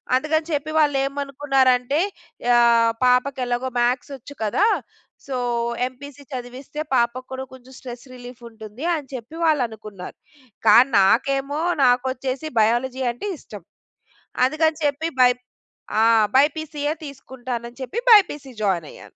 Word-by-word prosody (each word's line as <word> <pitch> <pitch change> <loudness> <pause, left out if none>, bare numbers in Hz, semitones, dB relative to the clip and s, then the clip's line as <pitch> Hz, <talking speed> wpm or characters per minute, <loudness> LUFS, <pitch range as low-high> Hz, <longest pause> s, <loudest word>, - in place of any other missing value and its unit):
అందుకని 310 +3 0
చెప్పి 300 +1 -2
వాళ్ళు 290 -2 +3
ఏమనుకున్నారంటే 275 -1 +1 0.6
ఆహ్, 230 -1 +5
పాపకి 255 +2 +2
ఎలాగో 245 +1 -2
మ్యాథ్స్ 250 +3 0
వచ్చు 270 +3 -12
కదా! 280 - +2 0.6
సో, 265 - -3 0.5
ఎంపీసీ 285 +2 -12
చదివిస్తే 255 +4 -7
పాపకి 240 +1 0
కూడా 265 0 -5
కొంచెం 260 0 -15
స్ట్రెస్ 245 0 -9
రిలీఫ్ 245 -1 -12
ఉంటుంది, 220 +6 -9
అని 285 -3 -8
చెప్పి 250 +6 -9
వాళ్ళు 300 -5 +3
అనుకున్నారు. 210 -4 -10 0.5
కానీ 240 +6 +7
నాకేమో, 275 +8 +1 0.2
నాకొచ్చేసి 260 +3 0
బయాలజీ 250 +4 0
అంటే 405 +12 -5
ఇష్టం. 205 -5 -11 0.8
అందుకని 315 +3 +1
చెప్పి 295 +3 0
బైపే 250 0 +4 0.6
ఆ! - - +5 0.3
బైపీసీయే 295 +1 +1
తీసుకుంటానని 250 -3 -7
చెప్పి, 390 - -3
బైపీసీ 295 - +4
జాయిన్ 175 -6 0
అయ్యాను. - - -14
260 Hz, 120 wpm, -22 LUFS, 245-285 Hz, 0.8 s, కానీ